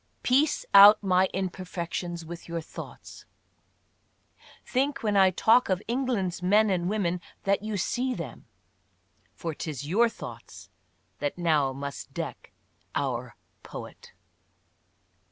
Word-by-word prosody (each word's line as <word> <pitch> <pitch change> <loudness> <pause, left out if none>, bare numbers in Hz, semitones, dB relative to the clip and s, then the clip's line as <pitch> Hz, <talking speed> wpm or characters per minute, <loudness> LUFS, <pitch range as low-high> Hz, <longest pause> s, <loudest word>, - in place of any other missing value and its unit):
"Piece 280 +4 +2
out 205 +2 +9
my 185 -1 +3
imperfections 175 -2 -4
with 170 +1 -9
your 170 0 -2
thoughts," 160 - -10 1.4
think 275 +1 -1
when 210 -2 +1
I 190 -1 +6
talk 220 +6 +3
of 185 -2 +1
England's 235 -8 -1
men 205 +3 +4
and 180 -1 0
women 180 -4 -1 0.2
that 195 0 +1
you 215 -1 -3
see 250 +7 -1
them. - - -8 0.4
" - - -41
For 165 -2 -4
'tis 145 -3 -5
your 230 +8 +3
thoughts - - -10 0.5
that 145 +2 -2
now 155 -6 +2
must 140 +1 -7
deck - - -6 0.4
our" 125 -4 -2 0.3
poet. - - -10
185 Hz, 120 wpm, -27 LUFS, 170-215 Hz, 1.4 s, out